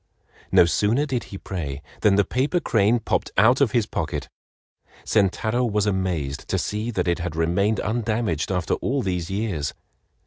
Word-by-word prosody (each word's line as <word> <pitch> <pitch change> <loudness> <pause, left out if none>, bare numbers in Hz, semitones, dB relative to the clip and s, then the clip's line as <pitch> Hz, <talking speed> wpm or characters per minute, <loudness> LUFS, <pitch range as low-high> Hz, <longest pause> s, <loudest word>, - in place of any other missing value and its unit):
No - - +7
sooner 110 +10 +2
did 130 -4 -2
he 100 - -8
pray 75 -8 -5 0.2
than 105 -3 +4
the 100 -1 +3
paper 135 - 0
crane 115 -5 +2
popped 115 - -1
out 125 +5 +5
of 140 - +5
his 115 -2 +2
pocket. - - -4 0.8
Sentaro 110 +4 +1
was 105 -3 +1
amazed 90 -8 -2
to 95 - 0
see 105 +5 -2
that 95 -6 -1
it 85 +1 +1
had 85 -2 -4
remained 95 +6 +1
undamaged 110 -7 -1
after 90 -2 0
all 135 0 -1
these 90 -2 -2
years. 95 -7 -2
100 Hz, 165 wpm, -23 LUFS, 90-115 Hz, 0.8 s, No